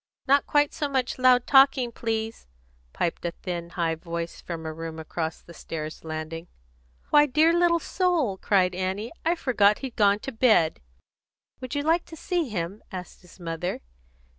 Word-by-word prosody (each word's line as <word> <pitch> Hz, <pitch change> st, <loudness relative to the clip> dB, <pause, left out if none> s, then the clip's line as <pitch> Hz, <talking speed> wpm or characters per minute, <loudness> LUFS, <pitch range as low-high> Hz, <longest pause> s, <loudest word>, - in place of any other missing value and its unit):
"Not 280 Hz, +1 st, +3 dB
quite 290 Hz, 0 st, +2 dB
so 295 Hz, -3 st, -2 dB
much 260 Hz, -2 st, -1 dB
loud 255 Hz, -1 st, +5 dB
talking, 270 Hz, -3 st, +5 dB
please," 225 Hz, -1 st, -3 dB, 0.4 s
piped 170 Hz, -, -2 dB
a 170 Hz, -, 0 dB
thin, 175 Hz, -2 st, -4 dB
high 170 Hz, -2 st, -1 dB
voice 170 Hz, +1 st, -5 dB
from 165 Hz, -2 st, -6 dB
a 160 Hz, -, -4 dB
room 165 Hz, 0 st, -6 dB
across 160 Hz, 0 st, -4 dB
the 170 Hz, -, -13 dB
stairs 155 Hz, -2 st, -7 dB
landing. 160 Hz, +1 st, -5 dB, 0.6 s
"Why, 295 Hz, 0 st, +6 dB
dear 310 Hz, +5 st, +4 dB
little 345 Hz, 0 st, +4 dB
soul!" 335 Hz, -, 0 dB
cried 185 Hz, -3 st, +2 dB
Annie. 190 Hz, +5 st, -3 dB
"I 335 Hz, +2 st, +2 dB
forgot 210 Hz, -9 st, +3 dB
he'd 255 Hz, -, -7 dB
gone 205 Hz, -2 st, +4 dB
to 270 Hz, -, -5 dB
bed." 220 Hz, -, +3 dB, 0.8 s
"Would 255 Hz, +2 st, -6 dB
you 285 Hz, -, 0 dB
like 330 Hz, +3 st, +2 dB
to 325 Hz, -, -11 dB
see 335 Hz, -2 st, -2 dB
him?" 195 Hz, 0 st, -4 dB
asked 180 Hz, -1 st, -8 dB
his 180 Hz, +1 st, -18 dB
mother. 170 Hz, +1 st, -4 dB
210 Hz, 165 wpm, -26 LUFS, 170-275 Hz, 0.8 s, Why